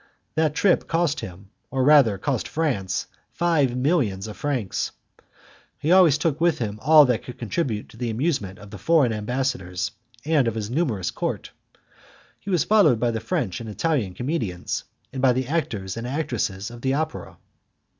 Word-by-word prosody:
That 155 -1 +1
trip 175 +3 +2
cost 165 -2 +1
him, 95 +2 -9 0.2
or 130 -1 0
rather 135 -8 +6
cost 125 +4 -2
France, 135 - -1 0.3
five 150 -8 +2
millions 125 - +1
of 105 -1 -7
francs. 130 -10 -2 0.8
He 155 - -1
always 180 -6 +6
took 160 -1 -1
with 170 -1 +3
him 105 -3 -4
all 150 +1 +7
that 125 -3 +1
could 125 - -9
contribute 115 - -2
to - - -15
the 120 0 -2
amusement 110 - -1
of 105 -1 -13
the 105 - -8
foreign 145 - +3
ambassadors 105 -5 -2 0.3
and 150 -5 +3
of 115 - -1
his 110 0 -4
numerous 125 - 0
court. - - -4 0.9
He - - -9
was 180 -5 +2
followed 195 - +4
by 120 0 +1
the 115 - -2
French 125 - -2
and 115 - -7
the - - -6
Italian 125 - -1
comedians, 115 - -3 0.3
and 130 - -4
by 130 -2 +5
the 130 0 -2
actors 110 - -2
and 115 +1 -5
actresses 120 -7 -2
of 120 0 -10
the 130 +1 +1
opera. 155 +1 -4
125 Hz, 175 wpm, -24 LUFS, 105-155 Hz, 0.9 s, all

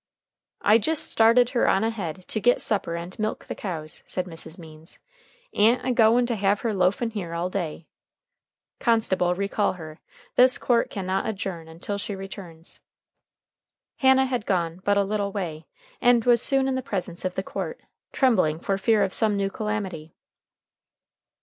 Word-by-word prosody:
"I 215 +2 +6
jist 315 +7 0
started 230 +2 +4
her 245 - +2
on 195 - +3
ahead 190 -6 -4
to 215 - -1
git 245 +3 +3
supper 195 -5 0
and 170 +4 -7
milk 215 0 -2
the - - -5
cows," 160 -6 -6
said 185 - -3
Mrs. 165 -1 -9
Means. 160 -1 -10 0.6
"A'n't 235 +5 +3
a 260 - +1
goin' 235 +1 +4
to 235 -1 -1
have 200 0 +1
her 230 -2 -1
loafin' 200 +5 +1
here 175 -6 -5
all 175 +2 -2
day." 170 -4 -4 0.9
"Constable, 190 -6 +2
recall 200 +2 0
her. 155 -3 -10 0.4
This 255 +1 +6
court 235 -2 +1
can 195 -3 -5
not 190 +1 -1
adjourn 190 -6 -4
until 175 +5 -5
she 200 0 -4
returns!" 190 -4 -9 1.2
Hannah 265 -1 +5
had 250 -4 -3
gone 175 -2 -1
but 205 0 +2
a 200 - +4
little 200 0 -2
way, 165 -6 -5 0.3
and 245 -2 +4
was 240 -1 +5
soon 270 0 +3
in 265 - 0
the 260 - -1
presence 185 -7 -4
of 185 -1 -2
the 190 - -2
court, 480 - -5 0.3
trembling 185 - +2
for 195 +2 -1
fear 215 +1 +3
of 190 - -1
some 215 -3 +1
new 195 0 -1
calamity. 195 -8 -4
200 Hz, 170 wpm, -25 LUFS, 180-230 Hz, 1.2 s, I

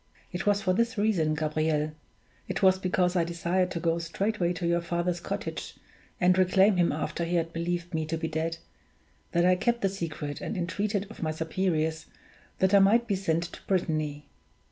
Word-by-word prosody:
It 180 +2 -4
was 205 0 +3
for 185 - +2
this 235 +3 0
reason, 185 -8 +2
Gabriel 155 0 0 0.6
it - - -3
was 190 0 +5
because 180 -1 +1
I 175 - +3
desired 170 +2 0
to 180 - -3
go 165 0 +1
straightway 175 +2 -1
to 175 0 -4
your 170 0 +2
father's 175 +1 -1
cottage, - - -5 0.4
and 180 0 +4
reclaim 190 +2 +4
him 175 -1 +3
after 155 +2 -2
he 170 +1 -1
had 165 -1 0
believed 170 +1 -3
me 160 -1 -1
to 165 +1 -2
be 160 0 -2
dead 160 +1 -2 0.7
that 170 +1 +3
I 185 0 +5
kept 235 +5 0
the 195 - +2
secret 155 -6 -5
and 220 - -4
entreated 200 +3 -1
of - - -11
my 160 - 0
superiors 160 0 -1 0.5
that 190 +1 +2
I 200 - +8
might 220 +5 +5
be 205 -4 0
sent 170 -3 0
to - - -9
Brittany. 155 -5 -1
175 Hz, 190 wpm, -28 LUFS, 160-190 Hz, 0.7 s, I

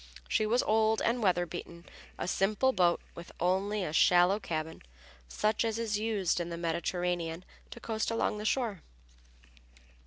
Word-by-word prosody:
She 215 - +1
was 240 +3 +2
old 220 0 +2
and 235 +1 +1
weather 180 -4 +2
beaten, 170 0 -8 0.3
a - - -3
simple 210 +7 +2
sailboat 180 -8 +2
with 170 - -10
only 190 +4 0
a 155 - -4
shallow 180 +4 +5
cabin, 160 -5 -4 0.5
such 210 - 0
as 225 -1 -1
is 220 -3 -1
used 210 -6 0
in 175 0 -3
the 170 - -5
Mediterranean 170 0 -2 0.2
to - - -10
coast 220 -1 -2
along 225 -2 -1
the - - -5
shore. 220 -7 0
195 Hz, 155 wpm, -31 LUFS, 175-220 Hz, 0.5 s, shallow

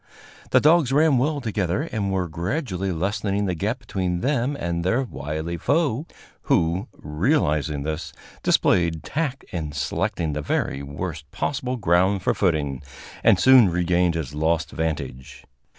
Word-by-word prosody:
The - - +5
dogs 155 -3 +4
ran 145 -2 +4
well 145 +2 0
together, 105 - -1
and 110 -10 -2
were 95 -2 0
gradually 95 - -2
lessening 100 +3 -1
the 90 - 0
gap 105 +8 -1
between 95 -8 -3
them 140 0 0
and 85 0 -2
their 115 +9 +1
wily 80 - -4
foe, 145 - 0 0.4
who, 85 +4 +2
realizing 75 - 0
this, 80 +2 -4 0.3
displayed 85 -3 +2
tact 145 -3 -3
in 80 -4 -4
selecting 75 +2 -1
the 75 - -2
very 70 -1 -1
worst 75 +1 -6
possible 130 - -2
ground 95 -1 +2
for - - +2
footing, 75 -8 0 0.4
and - - +5
soon 130 -6 +7
regained 90 0 +1
his 75 -4 -4
lost 80 +1 0
vantage. 75 -5 -4
90 Hz, 140 wpm, -23 LUFS, 80-125 Hz, 0.4 s, soon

